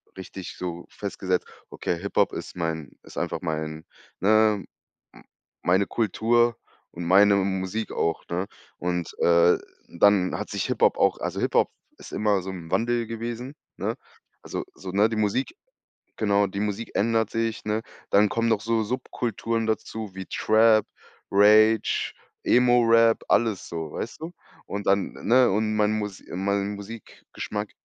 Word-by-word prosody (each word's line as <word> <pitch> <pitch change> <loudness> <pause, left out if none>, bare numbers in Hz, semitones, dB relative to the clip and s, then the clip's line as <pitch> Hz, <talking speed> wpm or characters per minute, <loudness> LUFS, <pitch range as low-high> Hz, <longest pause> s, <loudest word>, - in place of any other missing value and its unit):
richtig 95 -1 -8
so 85 -1 -5
festgesetzt: 95 -2 -2 0.2
„Okay, 85 - -2
Hip-Hop 100 +2 +1
ist - - -7
mein 80 -4 -3
ist - - -14
einfach - - -2
mein 80 0 -3 0.4
ne, 110 0 +4 0.5
m - - -16 0.4
meine 95 +3 +3
Kultur 120 +2 +2 0.4
und 85 - -7
meine 100 +3 +6
Musik 95 +2 -1
auch“, 85 -1 -1
ne? 90 +3 -1 0.3
Und, 90 -1 -2
äh, 85 0 +5 0.3
dann 95 +1 +3
hat - - -5
sich - - -2
Hip-Hop - - +2
auch - - +2
also, - - -3
Hip-Hop - - +2 0.3
ist - - -12
immer 105 -3 +1
so 95 +1 -6
im 85 -3 -9
Wandel 120 0 +1
gewesen, 120 +4 -5 0.2
ne? - - -2 0.5
Also - - -4
so 95 -1 -7
ne, 105 +3 +3
die 110 - -3
Musik 110 - 0 0.6
genau, 100 -2 +2
die 100 +1 -5
Musik 105 +2 -3
ändert 110 0 +1
sich, 115 0 -2
ne? 110 +1 -1 0.3
Dann 105 +1 +5
kommen 115 +2 0
noch 110 -2 +2
so 110 0 0
Subkulturen 115 -1 -2
dazu 110 -2 -3
wie 95 -1 -7
Trap, 110 0 +4 0.5
Rage, 110 +2 +4 0.3
Emo 125 0 +5
Rap, 115 0 +4
alles 110 -5 +1
so, 80 -2 -5
weißt 120 - -6
du? 170 +2 -5 0.3
Und 100 0 -5
dann, 100 0 +2
ne? 125 +1 +4
Und 110 +2 0
mein 105 0 +2
Mus 105 -2 -5
mein 100 +2 -1
Musikgeschmack 105 0 -7
105 Hz, 150 wpm, -25 LUFS, 95-115 Hz, 0.6 s, meine